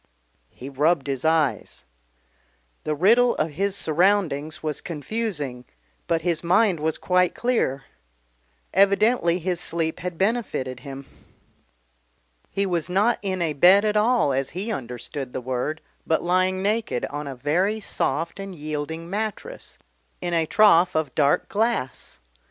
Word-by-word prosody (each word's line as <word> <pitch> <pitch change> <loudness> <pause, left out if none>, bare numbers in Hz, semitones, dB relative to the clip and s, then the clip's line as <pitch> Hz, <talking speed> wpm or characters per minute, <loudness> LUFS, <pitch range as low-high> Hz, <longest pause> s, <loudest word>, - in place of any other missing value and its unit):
He 130 - -11
rubbed 145 +2 +1
his 135 -3 -2
eyes. 155 - 0 1.0
The 155 - -1
riddle 235 +9 +4
of 155 +1 -1
his 195 +6 -1
surroundings 160 -4 +1
was 155 -2 -2
confusing 155 - -4 0.4
but 165 -1 0
his 170 -2 0
mind 180 +1 +3
was 160 +1 -1
quite 180 -1 +1
clear 225 - 0 0.9
evidently 200 -2 +3
his 180 -1 -2
sleep 165 -2 -2
had 180 -1 -5
benefited 190 - -1
him. 135 0 -9 1.4
He 200 - -1
was 175 -3 -1
not 205 +6 +2
in 185 -3 -2
a 160 -2 -1
bed 185 +8 +6
at 210 0 +1
all 215 - +3
as 135 0 -1
he 210 +5 -3
understood 125 - -6
the - - -2
word, 130 +5 -3 0.3
but 160 - +1
lying 185 +2 +1
naked 210 - 0
on 145 0 -5
a 135 - -5
very 180 - 0
soft 165 -3 -2
and 195 -1 -7
yielding 155 +2 -5
mattress, 210 +2 -5 0.4
in 175 -1 -3
a 165 -1 +1
trough 185 -5 +5
of 155 -5 -1
dark 145 -2 +2
glass. 220 - -2
170 Hz, 140 wpm, -24 LUFS, 145-200 Hz, 1.4 s, bed